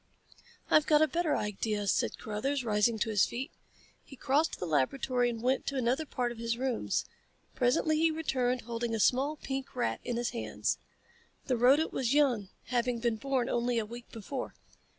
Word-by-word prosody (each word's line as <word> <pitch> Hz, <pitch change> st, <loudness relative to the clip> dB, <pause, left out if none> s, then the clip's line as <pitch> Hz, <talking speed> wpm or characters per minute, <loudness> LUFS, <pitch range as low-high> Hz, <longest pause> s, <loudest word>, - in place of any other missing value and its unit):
"I've 305 Hz, -, +5 dB
got 305 Hz, 0 st, +5 dB
a -, -, +4 dB
better 330 Hz, -1 st, 0 dB
idea," 210 Hz, 0 st, -2 dB
said -, -, +1 dB
Carruthers, 255 Hz, +5 st, -2 dB
rising 215 Hz, +1 st, +2 dB
to 220 Hz, +1 st, -1 dB
his 205 Hz, -2 st, +4 dB
feet. 265 Hz, +6 st, -5 dB, 0.5 s
He 270 Hz, -, -13 dB
crossed 285 Hz, +5 st, +1 dB
the -, -, -2 dB
laboratory 245 Hz, -, +1 dB
and 230 Hz, -1 st, -5 dB
went 260 Hz, +2 st, +1 dB
to 280 Hz, -, -1 dB
another 260 Hz, +4 st, 0 dB
part 245 Hz, -2 st, -1 dB
of 235 Hz, -, -9 dB
his 230 Hz, 0 st, -1 dB
rooms. 255 Hz, -1 st, -1 dB, 0.5 s
Presently 265 Hz, +5 st, +2 dB
he 325 Hz, +1 st, +4 dB
returned 255 Hz, -6 st, 0 dB
holding 230 Hz, 0 st, -3 dB
a -, -, -2 dB
small 270 Hz, +7 st, +3 dB
pink 270 Hz, -2 st, -5 dB
rat 245 Hz, -, -1 dB
in 240 Hz, -, -2 dB
his 240 Hz, 0 st, -1 dB
hands. 235 Hz, -, -2 dB, 0.7 s
The 255 Hz, -, +1 dB
rodent 265 Hz, +7 st, +4 dB
was 260 Hz, +1 st, 0 dB
young, 245 Hz, -10 st, +2 dB, 0.2 s
having 245 Hz, -1 st, +1 dB
been 230 Hz, -1 st, 0 dB
born 260 Hz, 0 st, 0 dB
only 240 Hz, -1 st, 0 dB
a 225 Hz, -, 0 dB
week 235 Hz, +2 st, -10 dB
before. 250 Hz, +4 st, -6 dB
245 Hz, 180 wpm, -31 LUFS, 230-270 Hz, 0.7 s, I've